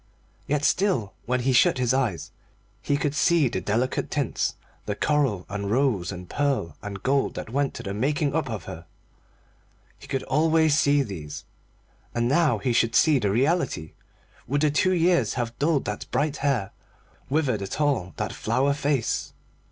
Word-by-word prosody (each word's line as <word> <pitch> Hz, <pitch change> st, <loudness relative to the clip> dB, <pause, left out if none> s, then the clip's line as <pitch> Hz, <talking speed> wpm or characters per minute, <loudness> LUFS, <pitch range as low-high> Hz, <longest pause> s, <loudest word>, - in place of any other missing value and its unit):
Yet 150 Hz, +1 st, 0 dB
still, 180 Hz, -, +1 dB
when 125 Hz, +1 st, +1 dB
he 130 Hz, +1 st, +1 dB
shut 125 Hz, -, +4 dB
his 125 Hz, -1 st, +1 dB
eyes, 125 Hz, -10 st, -1 dB, 0.5 s
he 145 Hz, -, 0 dB
could 145 Hz, 0 st, -1 dB
see 160 Hz, 0 st, +3 dB
the -, -, -3 dB
delicate 120 Hz, +5 st, -1 dB
tints, 145 Hz, -6 st, -1 dB, 0.3 s
the 105 Hz, -, -1 dB
coral, 135 Hz, -9 st, +1 dB
and 100 Hz, 0 st, -4 dB
rose, 115 Hz, -7 st, +1 dB
and 90 Hz, -2 st, -8 dB
pearl, 135 Hz, -, -1 dB
and 100 Hz, -1 st, -7 dB
gold 135 Hz, +1 st, +1 dB
that -, -, -6 dB
went 140 Hz, +2 st, 0 dB
to 120 Hz, -, -7 dB
the 100 Hz, -2 st, -4 dB
making 140 Hz, +6 st, 0 dB
up 155 Hz, -4 st, -1 dB
of 105 Hz, -6 st, -4 dB
her. 85 Hz, +2 st, -9 dB, 1.1 s
He -, -, -13 dB
could 135 Hz, -1 st, -2 dB
always 160 Hz, +1 st, +3 dB
see 145 Hz, -2 st, +3 dB
these. 80 Hz, -, -7 dB, 0.7 s
And 120 Hz, 0 st, +1 dB
now 145 Hz, -3 st, +3 dB
he 120 Hz, +4 st, -1 dB
should 115 Hz, 0 st, +2 dB
see 155 Hz, -4 st, +5 dB
the 105 Hz, -4 st, 0 dB
reality. 130 Hz, -, 0 dB, 0.5 s
Would 145 Hz, +2 st, 0 dB
the 150 Hz, -1 st, +3 dB
two 185 Hz, +6 st, +2 dB
years 170 Hz, -, +2 dB
have 120 Hz, -2 st, -2 dB
dulled 145 Hz, -1 st, +1 dB
that 105 Hz, 0 st, -4 dB
bright 150 Hz, 0 st, 0 dB
hair, 125 Hz, -9 st, 0 dB, 0.6 s
withered 135 Hz, -7 st, +1 dB
at 100 Hz, +7 st, -5 dB
all 140 Hz, -12 st, 0 dB
that -, -, -3 dB
flower 140 Hz, +2 st, +1 dB
face? 140 Hz, -4 st, -1 dB
130 Hz, 170 wpm, -25 LUFS, 105-145 Hz, 1.1 s, see